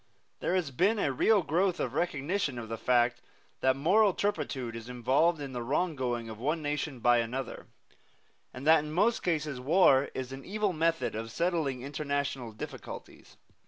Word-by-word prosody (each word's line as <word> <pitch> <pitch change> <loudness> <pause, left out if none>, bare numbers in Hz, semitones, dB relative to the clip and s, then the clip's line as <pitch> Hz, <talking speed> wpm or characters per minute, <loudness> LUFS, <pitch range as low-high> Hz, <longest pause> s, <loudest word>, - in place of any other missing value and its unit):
There 180 - 0
has 175 -6 0
been 190 - +2
a 145 - +1
real 200 - +3
growth 175 +4 +1
of - - -2
recognition 150 -2 -1
of 115 -2 -6
the 115 - -3
fact 120 -1 +2 0.4
that 130 0 +3
moral 190 +8 +3
turpitude 135 - -2
is 115 +1 -8
involved 135 +7 +2
in 140 -2 -6
the 120 - -3
wronging 130 -4 -1
of 110 -1 -8
one 150 +7 0
nation 145 -3 -3
by 120 0 +5
another, 120 +3 -4 0.8
and 130 +2 -9
that 160 -1 +6
in 150 - -6
most 210 +8 +2
cases 150 -6 -1
war 140 -1 +4
is 130 0 -4
an 135 0 -8
evil 205 0 -1
method 160 -6 0
of 115 +1 -5
settling 160 -6 -1
international 140 -4 -3
difficulties. 110 - -9
140 Hz, 165 wpm, -30 LUFS, 125-170 Hz, 0.8 s, that